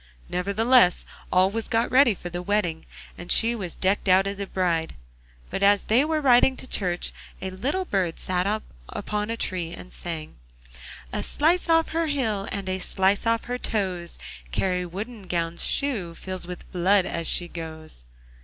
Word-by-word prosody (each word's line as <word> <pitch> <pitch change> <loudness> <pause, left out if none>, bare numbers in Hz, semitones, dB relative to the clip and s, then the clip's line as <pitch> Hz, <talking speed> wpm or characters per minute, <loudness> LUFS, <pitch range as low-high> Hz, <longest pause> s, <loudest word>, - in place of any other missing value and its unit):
Nevertheless 200 +3 +3 0.3
all 185 +1 +4
was 225 +1 -1
got 230 0 +1
ready 255 -4 +5
for 175 - -7
the 175 0 -4
wedding, 180 -4 -1 0.3
and 175 +1 -3
she 230 +1 +4
was 190 -7 -5
decked 195 +1 0
out 190 +1 +5
as 200 0 -3
a 200 - -3
bride, 170 -4 0 0.6
but - - -3
as 200 0 +5
they 235 +5 +4
were 310 0 0
riding 260 -1 +5
to - - -6
church 180 -8 0 0.3
a 190 - -4
little 280 - -2
bird 185 - -1
sat 180 0 -1 0.4
upon 210 0 -3
a 230 - -2
tree 180 -6 -2
and 180 - -10
sang: 160 - -6 0.8
'A - - -1
slice 335 +4 +1
off 325 0 +4
her 330 0 0
heel 225 -9 -1
And 200 -1 -4
a 185 0 -1
slice 190 +3 +1
off 230 0 +2
her 245 +1 -4
toes, 185 -7 -2 0.3
Kari 180 - 0
Woodengown's 180 -4 -3
shoe 215 -13 0
Fills 185 0 -5
with 180 0 -9
blood 185 +2 +3
as 170 -1 -3
she 175 - +2
goes! 160 - -8
195 Hz, 170 wpm, -25 LUFS, 175-230 Hz, 0.8 s, ready